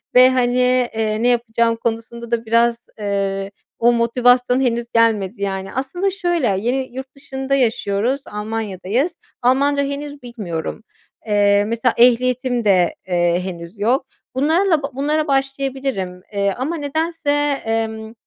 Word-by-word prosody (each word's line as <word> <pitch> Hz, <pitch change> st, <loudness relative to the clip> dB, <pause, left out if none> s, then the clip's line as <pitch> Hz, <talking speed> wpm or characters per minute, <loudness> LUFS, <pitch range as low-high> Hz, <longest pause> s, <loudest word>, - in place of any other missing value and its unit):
ve 255 Hz, +1 st, +8 dB
hani, 250 Hz, 0 st, +2 dB
eee, 220 Hz, 0 st, -1 dB
ne -, -, +4 dB
yapacağım 235 Hz, -1 st, +2 dB
konusunda 235 Hz, +1 st, -4 dB
da 235 Hz, -1 st, 0 dB
biraz, 230 Hz, +1 st, +3 dB, 0.2 s
eee, 195 Hz, -1 st, -2 dB, 0.3 s
o 240 Hz, +1 st, +5 dB
motivasyon 245 Hz, +2 st, +3 dB
henüz 235 Hz, -2 st, 0 dB
gelmedi 220 Hz, -3 st, +2 dB
yani. 195 Hz, -1 st, -3 dB
Aslında 275 Hz, +10 st, -1 dB
şöyle, 350 Hz, -7 st, 0 dB
yeni 255 Hz, +2 st, -2 dB
yurt 265 Hz, +1 st, -7 dB
dışında 270 Hz, 0 st, -3 dB
yaşıyoruz, 230 Hz, 0 st, 0 dB
Almanya'dayız. 215 Hz, -, -2 dB, 0.3 s
Almanca 280 Hz, +3 st, +3 dB
henüz 285 Hz, +1 st, -5 dB
bilmiyorum. 210 Hz, -6 st, -5 dB, 0.4 s
Eee, 205 Hz, -1 st, +4 dB
mesela 230 Hz, +2 st, +1 dB
ehliyetim 250 Hz, 0 st, +3 dB
de, 185 Hz, -4 st, +3 dB
eee, 175 Hz, -1 st, +2 dB
henüz 175 Hz, +1 st, -7 dB
yok. 245 Hz, +6 st, +1 dB, 0.3 s
Bunlarla 320 Hz, +4 st, +2 dB
ba 280 Hz, -, -2 dB
bunlara 300 Hz, +3 st, 0 dB
başlayabilirim. 270 Hz, -8 st, -2 dB
Eee, 200 Hz, -1 st, +1 dB
ama 280 Hz, +7 st, -2 dB
nedense, 315 Hz, +1 st, -1 dB, 0.3 s
emm, 220 Hz, 0 st, -2 dB
240 Hz, 130 wpm, -20 LUFS, 215-270 Hz, 0.4 s, ve